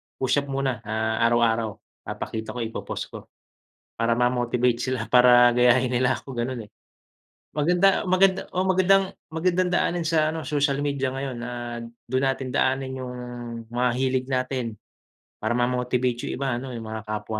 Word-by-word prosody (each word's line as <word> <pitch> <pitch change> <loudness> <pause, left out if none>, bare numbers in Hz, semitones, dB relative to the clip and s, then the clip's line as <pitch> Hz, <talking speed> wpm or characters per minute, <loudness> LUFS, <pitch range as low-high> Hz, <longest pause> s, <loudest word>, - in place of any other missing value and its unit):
Push-up 140 +2 0
muna, 135 -4 -1
ah, 110 +1 -1
araw-araw 115 -2 +2 0.3
papakita 110 +2 -5
ko, - - -4
ipo-post 115 - -5
ko. - - -10 0.7
Para 115 +1 +1
ma-motivate 120 0 +1
sila, 130 -4 -2
para 125 0 +6
gayahin 125 +1 +4
nila 125 +1 +2
ako 135 - -10
gano'n, 120 -2 -3
eh. - - -28 0.8
Maganda 175 +6 +3
maganda 185 +1 +4
o 185 +1 0
magandang 190 +1 +4 0.3
magandang 180 +2 +1
daanin 175 -1 +1
sa 155 -1 +2
ano, 160 - -4
social 145 -1 0
media 140 -2 -1
ngayon 135 -1 -4
na 120 +1 -5 0.6
do'n 130 +1 +1
natin 135 -1 -1
daanin 130 0 0
yung 125 -1 -6 0.6
mga 125 +1 +1
hilig 130 0 0
natin. 130 -1 -1 0.7
Para 110 +2 -1
ma-motivate 125 0 0
yung - - -3
iba 140 - 0
ano, 130 -1 -7
yung 115 - -6
mga 110 0 -5
kapwa 110 0 -3
130 Hz, 150 wpm, -25 LUFS, 120-140 Hz, 0.8 s, para